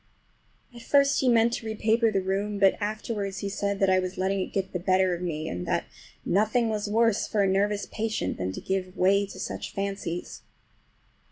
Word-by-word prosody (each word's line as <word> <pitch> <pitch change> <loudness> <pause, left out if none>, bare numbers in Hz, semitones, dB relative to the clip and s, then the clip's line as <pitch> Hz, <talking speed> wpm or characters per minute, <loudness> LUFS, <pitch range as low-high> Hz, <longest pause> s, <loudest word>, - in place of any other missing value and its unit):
At 235 - -11
first 280 +3 +3
he 260 - +2
meant 235 0 +4
to 235 - -4
repaper 220 +1 +2
the 195 -2 0
room, 200 +2 -1
but 195 -1 +5
afterwards 205 -2 -3
he - - -1
said 200 0 -2
that 195 - +3
I 185 - +4
was 185 0 -4
letting 195 +1 0
it 185 - -3
get 195 -1 -2
the 180 - -1
better 185 0 +2
of 175 - -4
me, 160 -3 -3
and 90 0 -4
that - - 0 0.4
nothing 220 +4 +2
was 210 -1 -2
worse 225 0 +2
for 210 -2 +1
a - - +3
nervous 200 +1 +1
patient 220 0 -3
than 90 0 -2
to - - -6
give 185 -1 -3
way 200 +2 +3
to - - -10
such - - -5
fancies. 195 -3 -4
200 Hz, 200 wpm, -27 LUFS, 190-220 Hz, 0.4 s, but